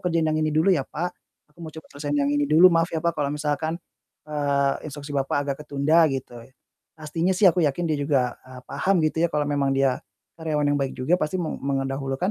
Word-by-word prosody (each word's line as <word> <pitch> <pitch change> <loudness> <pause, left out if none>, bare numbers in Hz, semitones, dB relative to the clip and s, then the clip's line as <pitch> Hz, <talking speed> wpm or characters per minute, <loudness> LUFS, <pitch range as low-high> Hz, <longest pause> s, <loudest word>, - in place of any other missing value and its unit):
kerjain 165 -2 +1
yang 155 0 +1
ini 155 - +1
dulu 165 +5 +4
ya, 160 - +2
Pak. 175 +3 -3 0.4
Aku 170 - -30
mau 160 - -7
coba 160 +1 -11
selesaiin 145 0 -3
yang 145 - +1
ini 145 -1 +1
dulu, 165 +4 +7
maaf 165 0 +2
ya 160 - -1
Pak, 170 - +2
kalau 145 -2 0
misalkan, 150 +2 -2 0.5
eee, 140 -2 0 0.2
instruksi 145 0 -8
Bapak 135 -1 0
agak 135 - -1
ketunda." 155 +3 +3
Gitu. 135 -2 -4 0.6
Pastinya 165 +4 -1
sih 200 - +2
aku 175 - -1
yakin, 160 +5 -1
dia 150 - 0
juga, 135 -4 0
eee, 130 0 -11
paham 190 -4 +1
gitu 155 +1 0
ya, - - +3
kalau 150 -1 +1
memang 140 -1 +1
dia 135 -2 +2 0.4
karyawan 155 -2 -1
yang 145 - +1
baik 135 - -2
juga 160 +8 +1
pasti 155 +4 -1
me 160 - -3
mendahulukan, 135 +4 -2
150 Hz, 215 wpm, -24 LUFS, 140-160 Hz, 0.6 s, dulu